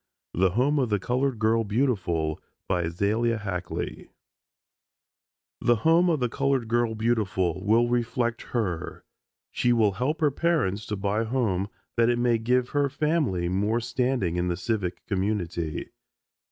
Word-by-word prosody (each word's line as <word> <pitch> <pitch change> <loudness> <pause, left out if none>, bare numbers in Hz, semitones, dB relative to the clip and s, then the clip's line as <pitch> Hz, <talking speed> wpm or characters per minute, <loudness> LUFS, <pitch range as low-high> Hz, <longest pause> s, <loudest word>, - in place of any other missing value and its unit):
THE 95 +2 +3
HOME 130 +10 +2
OF 125 -4 +1
THE 105 - +2
COLORED 125 +5 -1
GIRL 110 +1 +2
BEAUTIFUL 95 - 0 0.3
AZALIA 100 +7 0
HACKLEY 90 -4 -5 1.5
The 120 - +4
Home 165 +9 +4
of 160 -3 +1
the 125 - +1
Colored 135 -1 0
Girl 115 0 +1
Beautiful 95 -6 0
will 115 +3 +3
reflect 120 0 0
her. 95 -9 -3 0.5
She 125 - +1
will 110 -4 +4
help 130 - -2
her 150 -2 +3
parents 135 - 0
to 105 - -2
buy 100 +2 0
a - - -1
home 110 -6 0 0.3
that 115 0 +4
it 120 - +2
may 120 -1 +2
give 125 +2 +1
her 145 -1 +1
family 140 - 0
more 105 +6 +1
standing 120 -7 -1
in 90 0 0
the 85 -1 -1
civic 95 -2 -3
community. 95 -5 -2
115 Hz, 145 wpm, -26 LUFS, 95-125 Hz, 1.5 s, The